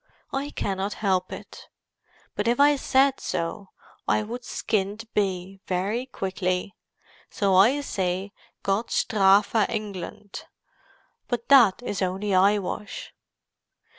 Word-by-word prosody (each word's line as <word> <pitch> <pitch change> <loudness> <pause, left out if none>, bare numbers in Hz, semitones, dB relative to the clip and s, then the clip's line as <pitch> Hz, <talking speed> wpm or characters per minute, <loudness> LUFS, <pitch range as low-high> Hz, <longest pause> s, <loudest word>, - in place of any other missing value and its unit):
I 275 +2 -2
cannot 195 -5 -2
help 185 -3 0
it. - - -10 0.7
But 205 - -2
if 240 +2 +2
I 290 +1 +6
said 270 0 +2
so, 170 +4 -3 0.4
I 215 - +2
would 240 +4 -6
skinned 210 0 -2
be, 190 -1 -2
very 200 +7 -1
quickly. 190 -4 -2 0.6
So 200 -2 0
I 220 +10 +5
say 190 -5 -2 0.3
'Gott 200 +4 0
Strafe 200 -3 +3 0.2
England!' 205 -2 -6 0.8
But 240 -2 -3
that 245 -6 +6
is 205 -4 -3
only 190 +2 -1
eyewash!" 200 +2 0
200 Hz, 110 wpm, -25 LUFS, 190-230 Hz, 0.8 s, I